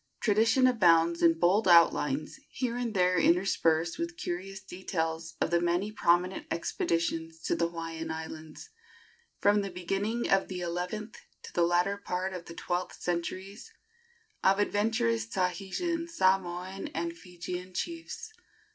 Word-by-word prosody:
Tradition 225 +4 +3
abounds 170 -8 +4
in 165 -1 +5
bold 185 +5 +3
outlines, 155 - +4
here 245 -3 -2
and 240 -3 -3
there 180 -1 +3
interspersed 170 - +2
with 335 0 -3
curious 190 - -4
details, 165 -3 -4
of - - 0
the 170 0 +3
many 175 +4 0
prominent 180 -2 +1
expeditions 165 -1 -1
to - - +1
the 170 - +1
Hawaiian 165 -1 -5
Islands, 160 - -7 0.7
from 205 0 +3
the 200 - -3
beginning 195 +6 -2
of 195 0 +3
the 185 -1 -5
eleventh 180 +6 -4 0.2
to - - -10
the 175 - +1
latter 180 +3 +2
part 190 -1 -3
of 175 -2 -7
the 170 - -10
twelfth 180 +2 -3
centuries, 185 +4 -4 0.7
of 195 +1 +5
adventurous 205 - +1
Tahitian, 195 - -2
Samoan 190 - 0
and 170 +1 -2
Georgian 180 +2 -7
chiefs. 335 - -5
180 Hz, 135 wpm, -30 LUFS, 170-200 Hz, 0.7 s, in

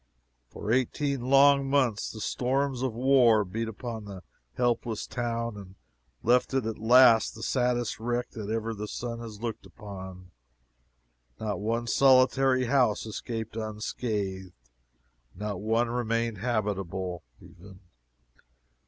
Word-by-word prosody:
For 105 - -5
eighteen 130 +2 0
long 140 +1 +5
months 130 -7 +1
the 110 - -8
storms 130 +3 -1
of 130 -1 0
war 120 -3 +4
beat 115 +5 -3
upon 110 0 -6
the 95 -3 -9 0.3
helpless 120 - -1
town, 115 -2 -3
and 95 -2 -11 0.5
left 125 +3 +2
it 130 -4 +1
at 110 -1 -4
last 115 0 +6
the 110 - -9
saddest 125 -3 0
wreck 120 +2 -2
that 105 -3 -7
ever 115 0 -2
the 105 0 -6
sun 115 +1 -5
has 110 -2 -9
looked 115 -2 -4
upon. 95 -4 -10 1.1
Not 105 -2 -3
one 115 +3 -1
solitary 130 +1 +4
house 125 -5 +2
escaped 110 0 -5
unscathed 105 -4 -4 0.8
not 100 0 -4
one 115 +3 +1
remained 115 -2 -1
habitable, 95 -6 -2 0.2
even. 95 +1 -15
115 Hz, 125 wpm, -28 LUFS, 105-125 Hz, 1.1 s, last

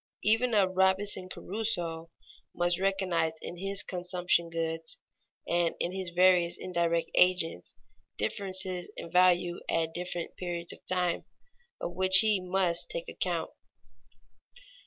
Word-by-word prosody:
Even 225 +3 +2
a 200 -2 +4
Robinson 190 0 +1
Crusoe 175 -6 -3 0.5
must 175 0 +1
recognize 185 -4 0
in 175 - -7
his 195 +2 +1
consumption 180 -1 0
goods 165 -1 -4 0.5
and 170 -1 +1
in 175 - -1
his 190 -1 -4
various 175 0 +3
indirect 170 -2 -1
agents 180 - +2 0.4
differences 185 - -1
in 165 - -7
value 180 -1 +3
at 165 -1 0
different 175 -1 -5
periods 175 -1 -2
of - - -17
time, 180 -2 0 0.5
of - - -4
which 185 +1 +6
he 215 -3 +2
must 180 - 0
take - - -4
account. - - -2
180 Hz, 120 wpm, -29 LUFS, 170-190 Hz, 0.5 s, which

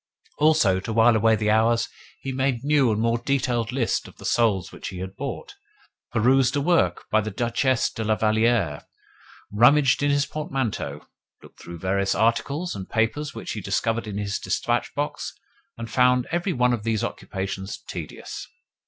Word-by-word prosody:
Also, 150 -12 +4
to 95 - -5
while 115 +1 +5
away 110 +1 +4
the 105 0 +1
hours, 115 +2 +3 0.3
he 135 - -4
made 130 -2 -1
new 140 -4 +3
and 105 - 0
more 115 +1 +1
detailed 120 -3 0
lists 125 -3 -1
of - - -16
the - - -11
souls 105 -6 +1
which - - -8
he 95 - -6
had 95 +1 -6
bought, 140 - -6 0.6
perused 125 +4 +3
a - - +2
work 170 +3 +2
by 110 - +4
the 110 - -4
Duchesse 120 +4 0
de 110 - -4
la 110 0 +2
Valliere, 110 -7 +1 0.7
rummaged 130 +6 +5
in 145 - +2
his 145 0 +2
portmanteau, 130 - -3 0.4
looked - - -17
through 85 0 -8
various 95 +3 0
articles 140 +9 0
and 95 -1 -7
papers 115 +7 -1
which - - -6
he 105 - -4
discovered 115 +4 -1
in 100 -1 -5
his 100 -1 -2
dispatch - - -1
box, - - -3 0.4
and 115 0 -5
found 125 -1 +3
every 175 +3 0
one 125 -5 +2
of 120 - -2
these 110 -1 -1
occupations 95 0 -4
tedious. - - -7
115 Hz, 170 wpm, -24 LUFS, 105-135 Hz, 0.7 s, while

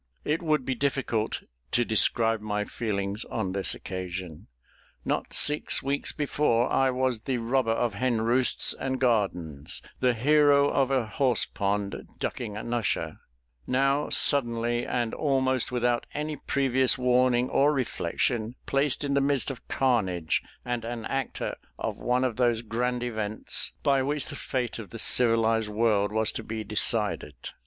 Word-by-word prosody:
It 155 +2 0
would 155 -5 +1
be 130 - 0
difficult 125 -4 -1 0.3
to 120 - +3
describe 115 0 +2
my 105 -1 -2
feelings 100 -2 -3
on 95 -5 -3
this 95 0 +1
occasion. 90 -3 -6 0.6
Not - - -1
six 150 +1 +2
weeks 140 +1 -1
before, 140 -5 +1
I 135 0 +3
was 130 -2 0
the 130 +3 -2
robber 120 +1 0
of 115 0 0
hen 120 +1 0
roosts 120 +3 +3
and 130 0 -3
gardens 90 - 0 0.2
the 125 -2 +2
hero 145 +3 +4
of 135 -2 +2
a 130 -4 +1
horse 125 +1 +1
pond, 100 0 -2
ducking 105 -4 -4
an 115 +2 -4
usher 120 -3 -1 0.5
now 135 +3 +1
suddenly, 120 -3 +2
and 120 -2 -1
almost 130 -4 +1
without 120 -1 0
any 150 +1 -2
previous 130 -2 +1
warning 125 0 +3
or 145 +2 +4
reflection, 120 - -1
placed 140 +1 0
in 140 -1 -1
the 140 - +3
midst 140 -1 +2
of 125 - -11
carnage, 95 -11 +1 0.2
and 120 -2 -2
an 115 -1 -5
actor 135 -2 -3 0.2
of - - -4
one 125 +1 +1
of 125 -4 -1
those 120 -2 +2
grand 120 +2 -1
events 110 -3 -1
by 135 -1 +3
which 145 +2 -1
the - - -8
fate 125 -3 -3
of 105 - -8
the 115 - -8
civilised 115 -2 +2
world 105 -2 +1
was 110 0 +2
to - - -5
be 110 0 -5
decided. 105 - 0
120 Hz, 150 wpm, -27 LUFS, 110-135 Hz, 0.6 s, hero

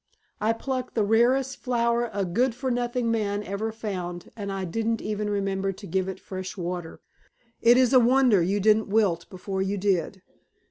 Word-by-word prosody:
I 220 +2 +2
plucked 255 +2 -4
the 220 - +2
rarest 245 +5 +2
flower 235 -1 0
a 200 -1 -1
good 235 +7 +1
for 260 +1 -2
nothing 240 -1 0
man 205 -2 -1
ever 205 +3 -3
found 180 -6 -5
and 200 -3 -5
I 195 -1 -3
didn't 225 +5 -1
even 210 0 -3
remember 195 -1 -1
to 200 +2 -11
give 190 +1 -1
it 190 - -6
fresh 185 +1 -7
water. 175 -2 -5 0.6
It 240 +1 +6
is 255 0 +4
a 255 - +8
wonder 245 -4 +4
you 195 +4 +1
didn't 215 +1 +3
wilt 195 -6 +1
before 190 +1 -4
you 195 +1 -1
did. 190 -1 -1
210 Hz, 180 wpm, -26 LUFS, 190-235 Hz, 0.6 s, a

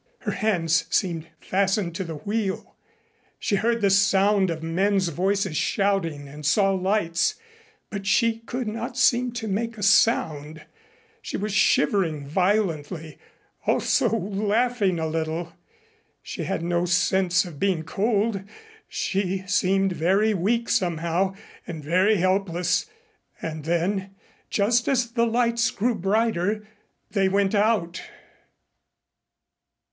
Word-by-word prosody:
Her - - -2
hands 180 -5 +1
seemed 170 -4 -1
fastened 195 -2 0
to 190 - -3
the 165 -3 -6
wheel. 200 +5 -3 0.6
She 205 -4 0
heard 230 +3 0
the 200 -1 +3
sound 195 0 +3
of 160 -1 -4
men's 190 +3 +1
voices 190 +1 0
shouting 165 -6 0
and 150 +2 -11
saw 195 +6 +3
lights, 185 -3 +1 0.6
but 200 -2 -5
she 225 +3 +2
could 240 +1 -5
not 230 +3 -4
seem 250 -1 +3
to 225 -2 -4
make 225 +3 -2
a 205 - -5
sound. 160 -7 +2 0.6
She - - -4
was 210 0 -3
shivering 160 -6 +2
violently, 165 -3 -1 0.5
also - - +2
laughing 205 +1 0
a 160 - -1
little, 160 +1 -2
but - - -25 0.7
she - - -5
had 190 -3 -2
no 175 0 0
sense 185 +1 +2
of 160 -5 -10
being 185 -5 +1
cold. 205 +3 0 0.5
She 190 -1 -2
seemed 195 -1 +2
very 195 +6 +2
weak 225 +6 0
somehow, 175 -1 0 0.3
and 160 -3 -6
very 185 +8 +3
helpless. 185 - +1 0.5
And 155 -2 -6
then, 190 +4 -1 0.3
just 235 +4 +2
as 245 -4 +1
the 235 -1 +1
lights 235 0 +2
grew 240 +3 0
brighter 210 0 0 0.4
they 195 -3 +2
went 195 +1 +1
out. 205 -5 +1
195 Hz, 125 wpm, -24 LUFS, 170-215 Hz, 0.7 s, the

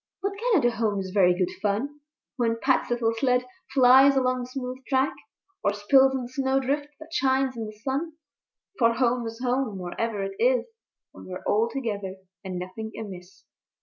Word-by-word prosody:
But 400 - 0 0.2
Canada 295 - +4
Home 215 -3 0
is 190 -1 -5
very 180 -3 +4
good 180 -1 0
fun 225 +9 -1 0.4
When 230 -3 0
Pat's 260 +1 +1
little 235 -2 +1
sled 250 +1 +1 0.3
flies 265 +1 +7
along 255 -1 +2
the 245 - -4
smooth 255 0 -5
track, 265 0 +2 0.5
Or 205 - +2
spills 265 +6 +4
in 260 - -2
the - - -6
snowdrift 270 +2 0
that 320 +1 -12
shines 265 -2 +1
in 225 -2 -4
the - - -7
sun. 270 +9 -3 0.7
For 230 -2 +4
Home 240 -1 +1
is 225 +1 -7
Home 250 -4 0
wherever 200 +4 -3
it 195 0 -4
is, 250 +2 +3 0.5
When - - -13
we're 185 0 -7
all 220 +3 +2
together 205 -7 -4 0.3
and 185 -2 -5
nothing 185 +5 -6
amiss. 185 -3 -9
245 Hz, 175 wpm, -26 LUFS, 205-265 Hz, 0.7 s, flies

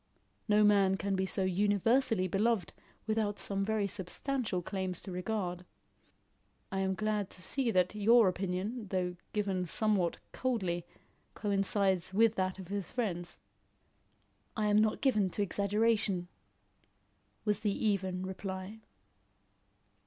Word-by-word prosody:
No 210 0 +5
man 200 -2 +4
can 195 +1 -1
be 190 0 0
so 190 - +2
universally 205 +3 +2
beloved 200 0 +1 0.3
without 215 -2 0
some 195 -1 -2
very 215 0 0
substantial 200 +2 -2
claims 185 -1 -3
to 190 - -8
regard. 180 -1 -3 1.1
I 195 - -1
am 190 0 0
glad 210 -1 -1
to - - -9
see 265 +2 0
that 185 -3 +2
your 220 +1 +5
opinion, 195 +5 -2
though 180 -2 -1 0.2
given 195 -4 -1
somewhat 200 -4 +1
coldly, 190 -10 -1 0.5
coincides 195 -2 +1
with 225 +1 +5
that 185 -2 -1
of 190 -2 -9
his 200 -3 -3
friends." 175 -8 -3 1.2
"I 215 - +1
am 205 0 +5
not 215 0 +2
given 215 -8 +3
to 205 - -1
exaggeration," 200 -2 +1 1.2
was 210 -2 +1
the 210 +1 -1
even 190 -3 0
reply. 190 +2 -6
200 Hz, 125 wpm, -32 LUFS, 185-215 Hz, 1.2 s, No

